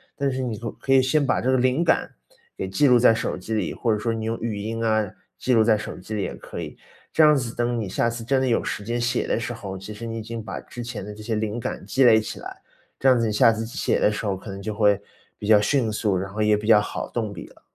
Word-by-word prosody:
但 140 -1 0
是 130 0 -2
你 120 -3 -2
总 115 0 -6
可 135 - +1
以 135 - +7
先 140 +3 +2
把 - - +1
这 130 - 0
个 130 - +4
灵 130 +5 +2
感 170 - +1 0.5
给 - - -3
记 145 - +2
录 125 -2 +6
在 120 - +6
手 115 - -2
机 95 +5 -5
里， 105 - -1
或 115 - -1
者 105 - +2
说 115 +2 -1
你 110 -1 -4
用 115 +1 -1
语 110 -2 -3
音 115 +2 -3
啊， 110 -3 +1 0.3
记 130 - +1
录 115 -2 +5
在 110 0 +4
手 105 - -6
机 95 +4 -8
里 105 - -1
也 - - -3
可 - - -8
以。 - - -8 0.4
这 160 - +5
样 150 0 +7
子 125 -5 -2
等 120 0 0
你 110 - -3
下 115 +5 0
次 115 0 -6
真 135 +2 +2
的 130 - +1
有 120 - +2
时 105 - -4
间 120 +3 -2
写 120 +1 0
的 - - 0
时 120 +1 -4
候， 100 -4 -7
其 95 +3 -8
实 105 +3 -8
你 115 0 -4
已 - - -4
经 115 +1 -6
把 - - -6
之 120 - -8
前 115 -4 -6
的 105 - -7
这 105 - -10
些 115 +1 -2
灵 110 +1 -2
感 - - -5
积 135 - +2
累 115 -3 +7
起 110 - -6
来， - - -8 0.4
这 135 - +1
样 130 -1 +6
子 115 -1 +1
你 - - -1
下 115 +2 +5
次 110 0 -3
写 125 +7 -1
的 105 - +4
时 105 - -4
候， 100 -2 0
可 95 +3 -10
能 95 - -7
就 110 +2 -4
会 105 -2 +3 0.4
比 105 - -6
较 105 -1 +6
迅 120 +2 +1
速， 105 -3 0
然 95 +1 -4
后 110 - -2
也 105 0 +4
比 105 +1 -6
较 110 -2 +7
好 - - -4
动 110 -3 -2
笔 90 - -8
了。 - - -21
115 Hz, 325 characters per minute, -24 LUFS, 105-120 Hz, 0.5 s, 以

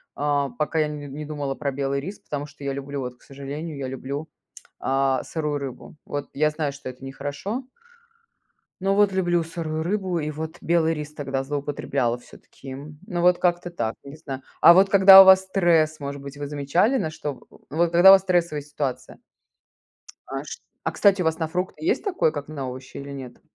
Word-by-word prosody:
а, 145 -1 0
пока 155 +1 0
я 155 - +2
не 150 -1 -6
не 145 +2 -7
думала 145 -2 -3
про 140 0 -3
белый 140 0 -1
рис, 190 +8 -7
потому 145 0 -5
что 145 0 -14
я 140 -1 -2
люблю, 140 0 -5
вот, 125 -1 -6
к - - -34
сожалению, 140 +3 -7
я 135 -1 -4
люблю, 135 +4 -5 0.5
а, 135 0 +1
сырую 150 -3 -3
рыбу. 135 +1 -8
Вот 145 0 -5
я 150 +2 +2
знаю, 150 -1 -2
что 140 -1 -8
это 130 +1 -10
нехорошо. 145 - -5 1.2
Но 195 +1 +2
вот 205 -1 +4
люблю 175 -3 +1
сырую 160 -1 -4
рыбу, 185 -1 -1
и 155 -1 -2
вот 160 +2 -6
белый 165 -1 +2
рис 150 -1 -6
тогда 135 -3 -3
злоупотребляла 140 -3 -2
всё-таки. 130 +2 -12
Ну, 155 +6 -6
вот 180 0 +4
как-то 175 0 0
так, 115 -7 -2
не 140 +1 -10
знаю. 135 -4 -7 0.2
А 170 - +10
вот 195 +2 +5
когда 195 0 +10
у - - +8
вас 190 0 +8
стресс, 170 -5 +2
может 140 -1 -6
быть, 140 0 -9
вы 145 0 -5
замечали, 150 - +1
на 160 - -1
что 150 -2 -5
в - - -18
в 145 - -14
вот 170 +1 +2
когда 175 +3 +8
у - - +11
вас 195 - +6
стрессовая 170 -5 0
ситуация? 145 -2 -5 1.2
А - - -1
ш - - -10 0.3
а - - -1
кстати, 200 -2 +3
у - - -1
вас 160 +1 0
на 160 - -1
фрукты 180 - -4
есть 385 - +1
такое, 365 - +1
как 145 -1 -6
на 140 -4 -5
овощи, 130 +1 -9
или 140 0 -7
нет? 130 -3 -9
150 Hz, 205 wpm, -24 LUFS, 140-175 Hz, 1.2 s, у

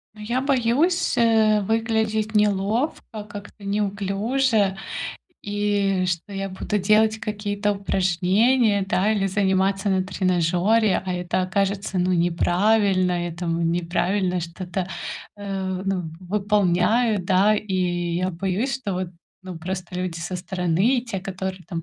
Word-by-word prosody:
Ну, 215 - -12
я 240 +4 -1
боюсь, 270 +5 +1
э, 220 -2 +4
выглядеть 220 0 0
неловко, 210 +3 0
как-то 205 0 -10
неуклюже, 205 +2 0 0.7
и 205 -2 0
что 180 +2 -3
я 195 0 -3
буду 195 +2 -2
делать 215 +3 +3
какие-то 205 -1 -1
упражнения, 200 +4 +2
да, 205 +1 +2
или 200 -2 +1
заниматься 195 0 +1
на 190 -1 +2
тренажёре, 185 +3 +1
а 185 - -2
это 180 +1 -1
окажется, 195 +1 -1
ну, 180 +1 +2
неправильно, 180 +1 +2
я 170 - -5
там 165 0 -1
неправильно 180 +2 0
что-то, 180 +2 -4 0.5
э, 190 -2 -3
ну, 195 -2 -1 0.2
выполняю, 205 +3 +2
да, 190 +4 +3
и 210 -2 -3 0.4
я 185 +1 0
боюсь, 195 +8 -1
что 230 -7 -3
вот, 185 0 -2 0.3
ну, 185 -3 -7
просто 180 +1 -5
люди 180 -2 -3
со 170 +2 -5
стороны, 185 +7 +1
те, 230 -6 -5
которые 190 0 -5
там 165 -2 -4
195 Hz, 125 wpm, -23 LUFS, 185-215 Hz, 0.7 s, э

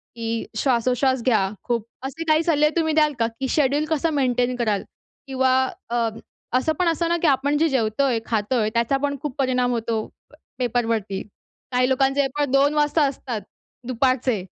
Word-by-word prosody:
की 230 -1 -3
श्वासोश्वास 255 +1 +1
घ्या 215 -7 +2
खूप. 235 -3 -1 0.2
असे 300 +5 -5
काही 310 +1 +4
सल्ले 300 -2 +3
तुम्ही 315 -2 +1
द्याल 305 -1 +3
का? 230 - +2
की 230 +4 -5
शेड्यूल 290 +1 +2
कसं 320 +1 +1
मेंटेन 250 -3 +1
कराल? 215 -5 0 0.4
किंवा 260 -1 +2 0.4
अ, 235 -1 +1 0.5
असं 315 +5 +1
पण 360 - +2
असतं 335 +1 +1
ना, 340 - +2
की 335 - +3
आपण 280 +1 +2
जे 325 +2 +2
जेवतोय, 245 0 +1
खातोय 220 0 0
त्याचा 235 +4 +1
पण 285 -1 0
खूप 295 -3 -4
परिणाम 250 -2 +1
होतो 230 -2 -1 0.3
प - - -25 0.2
पेपरवरती, 225 -5 -1 0.5
काही 250 0 +2
लोकांचे 270 +1 +2
पण 290 -3 0
2 280 +2 +4
वाजता 295 +1 +2
असतात 255 -5 -5 0.5
दुपारचे. 255 -4 +1
255 Hz, 165 wpm, -23 LUFS, 235-285 Hz, 0.5 s, काही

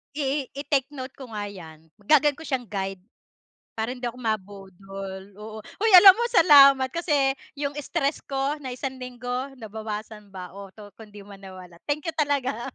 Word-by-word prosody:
I 280 -1 -2
i-take 280 -1 -1
note 265 -2 -8
ko 260 -4 -11
nga 205 -1 -4
'yan. 160 -5 -12 0.2
Gagawin 295 +4 +4
ko 325 - -11
siyang 260 -5 -3
guide. 195 -2 -4 0.8
Para 220 +1 -1
hindi 250 -1 -10
ako 245 +1 -4
mabudol, 195 -2 -6
oo. 215 +1 -9
Hoy, 445 +2 -1
alam 385 +1 +11
mo, 465 +5 -2
salamat 275 - +7
kasi 295 -5 +1 0.2
'yong 280 0 -3
stress 290 0 -1
ko 275 +2 -2
na 270 - -7
isang 265 +1 -5
linggo, 250 +1 -5
nabawasan 215 -2 -7
ba 180 -1 -8
o 200 +1 -10
'to 205 -1 -13
kung 220 -1 -12
'di 205 - -10
man 200 -1 -13
nawala. 185 -3 -12
Thank 290 +1 -1
you - - -24
talaga. 280 -5 -1
250 Hz, 175 wpm, -25 LUFS, 205-280 Hz, 0.8 s, alam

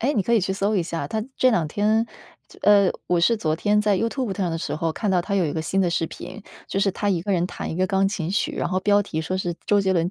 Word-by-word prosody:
诶， 275 +6 +1
你 205 - +2
可 235 - -1
以 220 - +4
去 190 +1 -1
搜 200 +2 0
一 185 - +2
下， 165 -4 -4
他 220 +6 -2
这 255 - +4
两 170 -9 +1
天 215 +5 +1 0.4
就 - - -17
呃， 200 -2 +5 0.2
我 175 -1 +2
是 230 +7 +3
昨 155 -7 0
天 210 +3 +2
在 210 -2 +2
YouTube 230 -1 -2
上 185 -4 -1
的 165 - -2
时 - - -3
候 165 0 -1
看 205 +5 -2
到 180 -2 +2
他 200 +3 -3
有 190 - +2
一 145 - -3
个 160 - -2
新 190 +5 0
的 185 - +2
视 165 -1 0
频， 185 +6 -9 0.3
就 195 - -1
是 195 0 +3
他 205 - -2
一 180 -4 +1
个 200 +2 -1
人 175 -1 +1
弹 180 - -6
一 160 - -4
个 185 +1 +2
钢 195 +1 +2
琴 175 -5 -3
曲， 200 - 0
然 - - -1
后 185 +1 0
标 205 +1 +3
题 160 -5 -4
说 175 +4 -2
是 175 -2 -2
周 205 -1 +4
杰 190 -1 +1
伦 170 -1 +1
190 Hz, 360 characters per minute, -23 LUFS, 175-205 Hz, 0.4 s, 呃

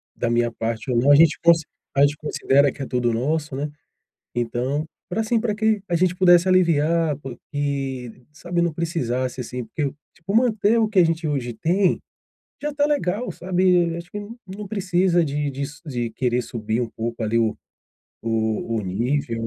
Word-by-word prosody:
da 120 - -1
minha 120 0 +1
parte 115 +2 -3
ou 120 - +1
não 130 +5 +4
a - - +9
gente 160 +1 +5
consi 170 -2 +5 0.3
a - - +5
gente 145 +1 +4
considera 140 -2 +2
que - - -10
é - - -2
todo 125 -2 0
nosso, 145 +4 -1
né, 145 +2 -3 0.6
então, 120 +5 -1 0.2
pra, 195 +5 -1
assim, 225 +1 +1
pra 215 -2 -1
que 215 -1 +1
a 175 - +1
gente 180 +1 +2
pudesse 175 -1 +5
aliviar 165 -3 +3
co 135 -4 -7 0.2
e, 135 -4 -2 0.2
sabe, 175 +3 -2
não 170 -1 +1
precisasse, 130 -7 -2
assim, 125 0 -5
porque, 145 +7 -3 0.3
tipo, 185 +3 -5
manter 225 -2 +3
o 225 - +3
que 215 -3 0
a - - +6
gente 165 0 0
hoje 130 -5 -2
tem, 180 - +2 0.6
já 295 - -1
está 290 0 +1
legal, 250 -6 0
sabe. 180 -2 +2
Acho 170 0 -8
que 205 - -4 0.3
não 200 +2 -7
precisa 180 -3 +2
de 145 -1 -1
de 140 +1 -3
su 145 +1 -11
de 120 -5 -2
querer 125 +1 0
subir 110 -1 -3
um 120 - -2
pouco, 115 +1 -5
ali, 110 +1 +1
o 115 -2 +1 0.7
o 110 0 -1
nível. 115 +4 -1
145 Hz, 185 wpm, -23 LUFS, 120-180 Hz, 0.7 s, a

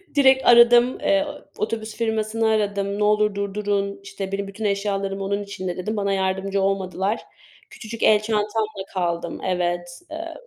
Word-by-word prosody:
Direkt 265 -1 +5
aradım. 240 +1 +6
Eee, 295 0 +2 0.3
otobüs 220 0 -3
firmasını 220 0 0
aradım. 205 -2 0
"Ne 210 - +2
olur 210 -1 +2
durdurun. 200 0 -2
İşte 195 -1 -6
benim 200 0 -2
bütün 205 +2 -6
eşyalarım 200 -1 -1
onun 200 +1 -1
içinde" 185 -3 -5
dedim. 215 +4 -3
Bana 200 -1 0
yardımcı 190 +1 0
olmadılar. 195 +2 -1 0.5
Küçücük 225 0 -7
el 215 -1 +6
çantamla 215 -2 -1
kaldım. 170 -3 -2
Evet, 175 -1 -2
eee, 330 +1 -6
200 Hz, 145 wpm, -23 LUFS, 195-220 Hz, 0.5 s, aradım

